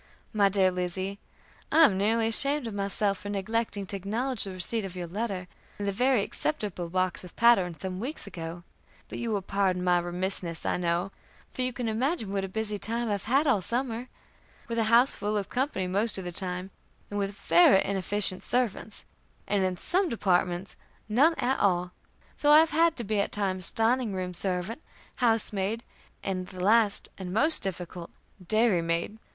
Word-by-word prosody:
"MY 205 -2 +4
DEAR 190 -1 +3
LIZZIE: 185 +2 -3 0.5
I 325 +1 +7
am 205 - +3
nearly 220 +3 +2
ashamed 275 +5 +2
of 225 - -5
myself 200 0 -1
for 205 - -7
neglecting 205 0 -2
to 200 - -5
acknowledge 220 +5 -1
the 195 - -5
receipt 185 +5 -2
of 190 -2 -7
your 180 -1 -4
letter, 190 0 -4 0.3
and 205 - -4
the - - +1
very 245 +1 +2
acceptable 205 - -3
box 185 +1 -1
of 180 - -12
patterns, 190 -9 +3
some 185 -1 -4
weeks 265 +9 -4
ago; 170 -2 -7 0.5
but - - -6
you 235 - -3
will 205 -3 -1
pardon 190 -2 0
my 180 -1 +3
remissness, 175 -1 -3
I - - 0
know, 175 +2 -1 0.4
for - - -5
you 255 0 0
can 245 -1 -4
imagine 225 - -1
what 195 -1 -1
a - - -2
busy 210 +1 -2
time 230 +1 -2
I've 200 -2 -2
had 270 +7 +2
all 255 -9 +3
summer, 240 +3 -2 0.6
with 230 0 -2
a 225 - +2
house 235 +4 +5
full 210 +1 -2
of 200 -1 -3
company 255 -7 -1
most 200 +5 +1
of 190 - -5
the 175 - -5
time, 180 +1 -3 0.4
and 205 - -2
with 200 0 -2
very 300 - +5
inefficient 195 0 +1
servants, 230 -4 -2 0.4
and 200 -1 +1
in 185 -1 -1
some 370 - 0
departments 185 -4 0 0.3
none 280 +10 +4
at 265 -1 0
all; 180 -2 +1 0.4
so 295 - +2
I 300 - +9
have 320 +1 +5
had 330 0 +3
to 240 - -5
be 215 -1 -1
at 200 - 0
times 185 -3 +1
dining 225 -2 +1
room 180 -1 -3
servant, 185 - -3 0.4
house 225 -3 +2
maid, 205 +4 -2 0.4
and 185 -2 -3
the 185 -1 -7
last 215 0 +3
and 185 -1 -5
most 305 - +5
difficult, 180 -2 -6 0.4
dairy 215 -4 +3
maid. 170 +6 -2
200 Hz, 185 wpm, -28 LUFS, 185-230 Hz, 0.6 s, I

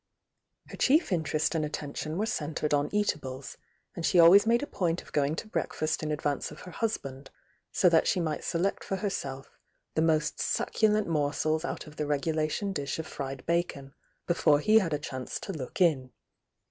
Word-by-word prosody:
Her - - -9
chief 305 - +3
interest 160 -2 0
and 160 -2 0
attention 150 +1 -4
were 210 - +1
centred 150 -6 -2
on 145 0 +2
eatables, 140 -10 -2 0.4
and 170 - -5
she 180 - +2
al 170 0 +9
ways 200 +3 +7
made 235 +3 +3
a - - -1
point 175 -9 -1
of - - -17
going 145 +1 +1
to 215 - -6
breakfast 155 -6 -2
in 155 -1 -2
advance 145 -1 -1
of - - -11
her 180 - -10
husband, 140 - -4 0.4
so 185 - +3
that 165 -2 +4
she 190 - +2
might 155 -3 -2
select 175 +3 -1
for 195 - -2
herself 140 -9 -4 0.4
the 160 - +1
niost 155 -1 +1
succulent 215 -1 +1
morsels 155 0 0
out - - -4
of 150 -1 -13
the 150 - -2
regulation 155 +6 -1
dish 145 -5 -3
of 160 - -4
fried 135 -1 -6
bacon, 170 -5 -1 0.3
before 155 -4 +3
he 215 +8 +5
had 180 -6 -2
a 150 - +1
chance 130 -3 -5
to 195 - -5
look 140 0 -6
in. 150 -8 +3
155 Hz, 185 wpm, -29 LUFS, 145-180 Hz, 0.4 s, al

